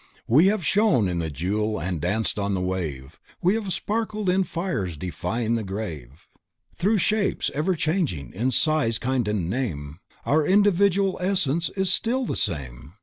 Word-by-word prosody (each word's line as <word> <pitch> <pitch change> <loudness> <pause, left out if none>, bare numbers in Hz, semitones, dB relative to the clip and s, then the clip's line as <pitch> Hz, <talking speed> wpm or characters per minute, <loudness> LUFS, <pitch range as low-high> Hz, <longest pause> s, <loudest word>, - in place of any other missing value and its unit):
We 150 +11 +5
have 200 -4 +1
shone 200 - +3
in 90 -1 -1
the 80 -1 -2
Jewel 105 +9 -1
and 85 -3 -3
danced 105 +5 0
on 100 -1 0
the - - -1
Wave, 80 -7 -4 0.2
We 180 +3 +3
have 215 -3 -2
sparkled 215 +1 -2
in 190 +1 +2
Fire 170 - -2
defying 90 +8 -3
the 115 -1 0
grave; 85 - -6 0.5
Through 205 +5 +2
shapes 210 +2 +1
everchanging, 155 - -1
in 120 +7 0
size, 135 -3 +2
kind 125 -2 -1
and 105 -5 -1
name 85 - -3 0.3
Our 155 +2 +3
individual 200 +1 +3
essence 170 -4 +1
still 230 +7 +1
is - - -4
the - - -1
same. 70 -1 -3
120 Hz, 155 wpm, -24 LUFS, -, 0.5 s, We